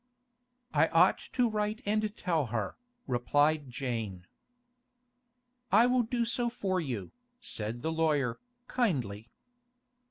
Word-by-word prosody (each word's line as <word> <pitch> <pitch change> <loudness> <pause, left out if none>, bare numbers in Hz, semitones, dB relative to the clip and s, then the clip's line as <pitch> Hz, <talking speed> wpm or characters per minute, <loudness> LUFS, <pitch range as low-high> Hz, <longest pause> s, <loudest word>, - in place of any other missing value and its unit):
'I 155 +2 +5
ought 170 +4 +4
to 250 -2 +3
write 215 +2 -2
and 215 0 0
tell 165 -7 0
her,' 110 -3 -2 0.3
replied 145 +3 +2
Jane. 115 -8 -4 1.5
'I 220 +4 +7
will 250 0 +3
do 235 0 0
so 240 +1 0
for 190 -5 -1
you,' 120 - -4 0.3
said 115 - -4
the 160 - 0
lawyer, 150 -7 +1 0.3
kindly. 120 - -1
160 Hz, 115 wpm, -31 LUFS, -, 1.5 s, I